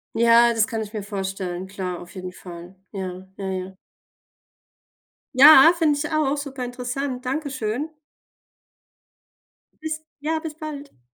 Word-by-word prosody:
Ja, 235 +1 +5
das 225 -2 +3
kann 225 -2 -4
ich 210 -1 -6
mir 215 -2 -5
vorstellen, 190 -2 -4
klar, 185 -2 -5
auf 175 +3 -13
jeden 185 -1 -6
Fall. 175 0 -11 0.2
Ja, 185 -2 -6
ja, 195 - -5
ja. 190 0 -4 1.6
Ja, 285 +3 +9
finde 305 -4 +2
ich 300 +2 -3
auch. 295 -2 +1
Super 275 -3 -5
interessant. 250 +1 -4
Dankeschön. 265 -1 -2 1.9
Bis 315 0 -3 0.2
ja, 315 +2 -1
bis 315 -2 -7
bald. 290 - -8
235 Hz, 130 wpm, -23 LUFS, 190-285 Hz, 1.9 s, Ja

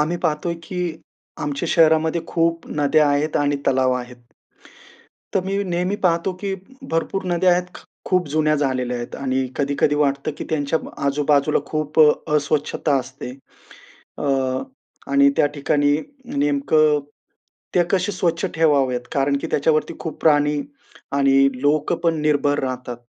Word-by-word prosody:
आम्ही 160 +4 0
पाहतोय, 155 +2 -1
की 170 -2 -4 0.4
आमच्या 145 +3 -3
शहरामध्ये 160 0 +3
खूप 165 0 0
नद्या 145 +1 +3
आहेत 145 +2 +1
आणि 145 0 +1
तलाव 130 -1 +3
आहेत. 125 0 -6 1.2
तर - - +3
मी 195 +1 -1
नेहमी 180 +2 -1
पाहतो, 180 -2 +1
की 195 -1 -2 0.4
भरपूर 165 +4 -1
नद्या 180 +1 +3
आहेत, 175 0 +1
ख - - -14 0.2
खूप 180 -2 +1
जुन्या 155 +1 +2
झालेल्या 130 -3 -1
आहेत 120 0 -6
आणि 130 -1 -1
कधी-कधी 140 +1 +1
वाटतं, 140 -1 0
की - - -4
त्यांच्या 155 0 0 0.3
आजूबाजूला 145 +1 +2
खूप 155 0 -1 0.3
अस्वच्छता 150 0 +1
असते. 130 0 -9 0.9
अ, - - -4 0.9
आणि 140 0 +5
त्या - - +4
ठिकाणी 145 0 +2 0.4
नेमकं 145 +1 +2 0.7
ते 180 - +5
कसे 190 +1 +1
स्वच्छ 175 -1 0
ठेवावेत? 140 -6 +2
कारण 140 0 +1
की - - -2
त्याच्यावरती 155 +2 +1
खूप 160 -3 -6
प्राणी 145 -1 +3 0.5
आणि 135 -1 +4
लोक 150 +2 +2
पण 165 -1 +2
निर्भर 145 -1 +2
राहतात. 125 -2 -4
150 Hz, 135 wpm, -21 LUFS, 140-165 Hz, 1.2 s, आणि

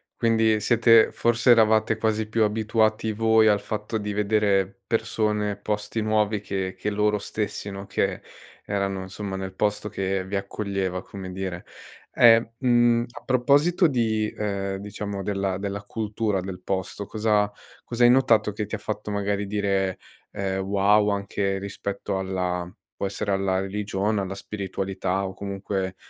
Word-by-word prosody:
quindi 110 -2 +3
siete 115 0 +5
forse, 120 +1 +3
eravate 110 -1 +4
quasi 110 -1 0
più 110 0 +1
abituati 110 0 +1
voi, 110 0 +4
al 105 -1 +3
fatto 110 +1 -3
di 105 0 -3
vedere 100 -2 +1
persone, 105 -2 0
posti 105 +1 -3
nuovi 105 -1 +1
che 95 -2 -3
che 105 - -2
loro 105 0 +1
stessi, 105 0 -4
no, 100 0 -7
che - - -1 0.4
erano 100 -1 -1
insomma, 95 +1 -6
nel 95 -1 -5
posto 105 +1 -1
che 95 -1 -2
vi 100 +1 -4
accoglieva, 100 -2 -2
come 95 -2 -8
dire. 95 -2 -5 0.5
E, 115 -1 +6
mhmm, 120 -2 +3
a - - -11
proposito 145 +8 +3
di, 110 -5 0
uhm, 100 -2 -2
diciamo 100 0 -5
della 100 -2 -1
della 100 0 -4
cultura 105 -2 -2
del 90 0 -7
posto. 95 +2 -3
Cosa 105 -1 +1 0.3
cosa 120 0 -1
hai 120 - +8
notato 120 -5 +4
che 105 +1 -3
ti 105 - -13
ha - - -4
fatto 105 0 -4
magari 100 0 -1
dire, 100 -2 0 0.3
ehm: 95 -1 -2
"Wow!" 100 +2 +3
anche 100 -1 -1
rispetto 100 0 -4
alla 90 -2 -2 0.3
può - - -2
essere 100 +1 -3
alla 95 -1 +1
religione, 100 +1 -1
alla 95 0 -4
spiritualità 95 -1 -3
o 95 - -7
comunque, 95 -1 -4
105 Hz, 150 wpm, -25 LUFS, 95-110 Hz, 0.5 s, hai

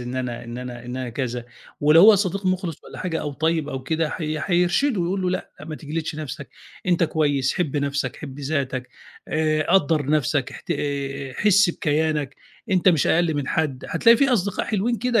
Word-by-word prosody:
إن 125 +1 -5
أنا 125 -2 -4
إن 120 +1 -7
أنا 125 -1 -7
إن 125 +1 -6
أنا 130 -1 -4
كذا 120 0 -3 0.4
ولو 150 +3 +6
هو 215 +2 +9
صديق 195 0 -1
مُخلِص 185 -4 -2
والّا - - -10
حاجة 170 -3 -2
أو 150 - -4
طيب 160 +1 0
أو 130 -3 -4
كده 160 +3 -1
حي 155 -2 -3
حيرشده 180 - +2
يقول 185 +3 -1
له 180 - +1
لأ، 185 - -3
ما 155 0 -6
تجلدش 155 +1 -4
نَفْسك 140 -4 -6 0.4
أنت 175 -1 +3
كويس، 145 -4 +1
حِب 155 -6 -1
نَفْسك، 140 -2 -1
حِب 140 -1 -8
ذاتك، 135 -3 -2 0.4
آآ 155 0 +1
قدر 160 -6 +3
نَفْسك 145 -2 +1
احت - - -10
آآ 140 -3 -3
حِس 200 -2 +4
بكيانك، 150 -4 -1 0.3
أنت 185 -1 +4
مش 165 -6 +3
أقل 170 -1 +2
من 145 -2 -2
حد 145 -5 -1
هتلاقي 230 +8 +5
في 275 +3 +3
أصدقاء 200 -4 0
حلوين 220 +3 0
كده 245 -2 +2
155 Hz, 190 wpm, -23 LUFS, 135-180 Hz, 0.4 s, هو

